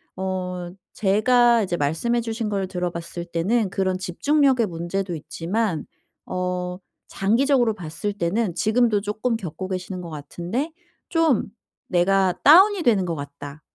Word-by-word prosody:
어 180 -1 -3 0.2
제가 235 +3 +4
이제 180 -3 -1
말씀해 165 +12 0
주신 225 -1 -3
걸 195 -2 -1
들어봤을 175 -2 -4
때는 190 +6 0
그런 190 -1 0
집중력의 260 - +2
문제도 175 +2 -3
있지만 170 +4 -2 0.4
어 180 0 -3 0.3
장기적으로 240 +3 +2
봤을 170 +3 -4
때는 195 +1 -1
지금도 220 -1 +2
쪼끔 215 +4 -1
겪고 185 -2 -6
계시는 185 0 -4
것 170 - -8
같은데 175 - -4 0.4
좀 325 - +2 0.4
'내가 185 +1 +3
다운이 375 +5 +7
되는 215 -8 +3
것 170 -2 -2
같다.' 145 +1 -8
190 Hz, 280 characters per minute, -23 LUFS, 175-230 Hz, 0.4 s, 다운이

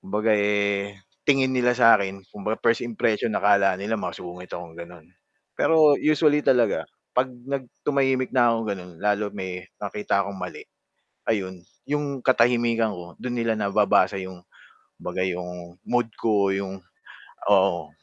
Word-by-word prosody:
kumbaga 105 +3 0
eh, 100 -1 +1 0.3
tingin 135 -2 +3
nila 125 -1 +2
sa 115 -3 +6
'kin, 95 0 -4
kumbaga 105 +2 -3
first 115 0 +3
impression 115 -1 -1
akala 100 -2 +3
nila 105 +3 -2
masungit 90 +1 -7
ako 85 -1 -8
gano'n. 85 -1 -11 0.5
Pero 155 -3 +5
usually 150 -1 +3
talaga, 125 -5 +2 0.3
'pag 125 +1 +1 0.2
nag 135 -1 -3 0.2
tumahimik 135 -2 +1
na 120 -2 +4
ako, - - 0 0.2
gano'n, 90 -2 -8
lalo 105 0 +1
may 95 -2 -6 0.2
nakita 100 0 -1
akong 100 0 -7
mali, 90 -1 -7 0.7
ayun. 95 -4 -2 0.3
'Yong 145 -2 -2
katahimikan 120 -3 +2
ko 85 -1 -10
do'n 125 -1 -4
nila 115 -1 +1
nababasa 100 -1 +2
'yong 95 -1 -9 0.6
kumbaga 95 - -4
'yong 90 -1 -6
mood 120 -2 0
ko, 100 -3 +2
'yong 95 -1 -5 0.7
oo. 95 -4 +2
105 Hz, 140 wpm, -24 LUFS, 95-120 Hz, 0.7 s, sa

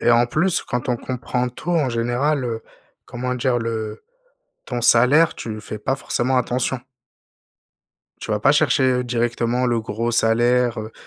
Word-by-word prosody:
Et - - +1
en 120 +1 +5
plus 175 +8 0
quand 125 0 -4
on 125 - +1
comprend 125 0 -3
tout 140 +7 -6
en 155 -6 +2
général, 125 +4 0
heu, 115 -2 -3 0.4
comment 125 +1 -3
dire? 125 0 0
Le 110 -2 -4 0.6
ton 125 -2 -4
salaire, 125 +8 +5
tu 110 -2 -6
y 110 - -8
fais 105 0 -7
pas 130 +6 -1
forcément 130 -1 -1
attention 125 +1 -1 1.4
tu - - -6
vas 105 -1 0
pas 135 - +4
chercher, 150 -2 +3
heu, 125 -1 +2
directement 120 +1 0
le 120 -2 +1
gros 115 +2 -3
salaire, 120 +1 +2
heu, 110 +1 -6
120 Hz, 170 wpm, -21 LUFS, 115-130 Hz, 1.4 s, en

